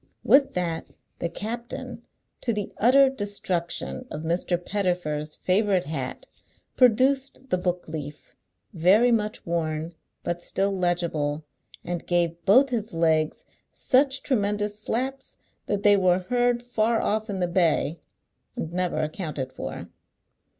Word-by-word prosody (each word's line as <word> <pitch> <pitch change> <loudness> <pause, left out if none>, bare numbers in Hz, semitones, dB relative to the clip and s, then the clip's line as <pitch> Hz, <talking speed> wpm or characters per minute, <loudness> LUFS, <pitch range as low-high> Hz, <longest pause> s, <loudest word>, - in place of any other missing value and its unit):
With 275 0 +4
that 170 -2 -2 0.3
the 170 - -1
captain, 230 +7 -6 0.4
to 240 - 0
the 210 -2 -4
utter 270 +5 +6
destruction 205 -2 -3
of 155 - -6
Mr. 175 +2 0
Pettifer's 175 -5 -2
favourite 190 -1 +2
hat, 135 -4 -5 0.5
produced 260 +2 +2
the 185 - +2
book 180 0 -2
leaf, 150 -2 -8 0.4
very 200 +8 +4
much 215 -2 -1
worn, 165 -1 -2 0.3
but 175 0 -3
still 195 +1 0
legible, 170 -5 0 0.4
and 175 -1 -4
gave 170 -1 +1
both 260 +8 +6
his 220 -5 -2
legs 160 -2 +1 0.3
such 270 +1 +2
tremendous 210 -4 0
slaps 260 +5 -3 0.3
that 205 -1 -1
they 205 -1 +7
were 185 -2 +3
heard 245 -1 +2
far 230 -1 +1
off 215 +1 -1
in 195 -2 -3
the 180 - +1
bay, 170 -2 +1 0.6
and 165 +1 -5
never 180 0 0
accounted 150 -5 -4
for. - - -6
185 Hz, 130 wpm, -25 LUFS, 170-225 Hz, 0.6 s, they